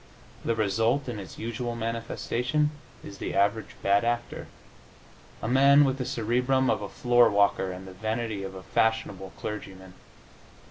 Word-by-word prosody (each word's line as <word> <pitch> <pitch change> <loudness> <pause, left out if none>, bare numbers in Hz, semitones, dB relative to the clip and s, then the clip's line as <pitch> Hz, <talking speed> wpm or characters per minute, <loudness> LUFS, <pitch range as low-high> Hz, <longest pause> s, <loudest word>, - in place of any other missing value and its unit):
The 115 - 0
result, 115 +6 +1
in 120 -4 -4
its 95 - -9
usual 115 +1 -4
manifestation, 120 +5 -1 0.3
is 100 -1 -10
the - - -4
average 105 +3 +1
bad 100 +2 +3
actor 120 0 -2 1.0
a - - -1
man 140 +3 +6
with 135 0 -1
the 125 - -2
cerebrum 125 +2 +1
of - - -1
a 100 - -5
floor 120 -1 +4
walker 100 -2 +2
and 90 +1 -8
the 95 - -9
vanity 110 +1 -3
of 95 0 -6
a 95 - -9
fashionable 105 -4 0
clergyman. 95 -3 -7
115 Hz, 150 wpm, -27 LUFS, 100-120 Hz, 1.0 s, man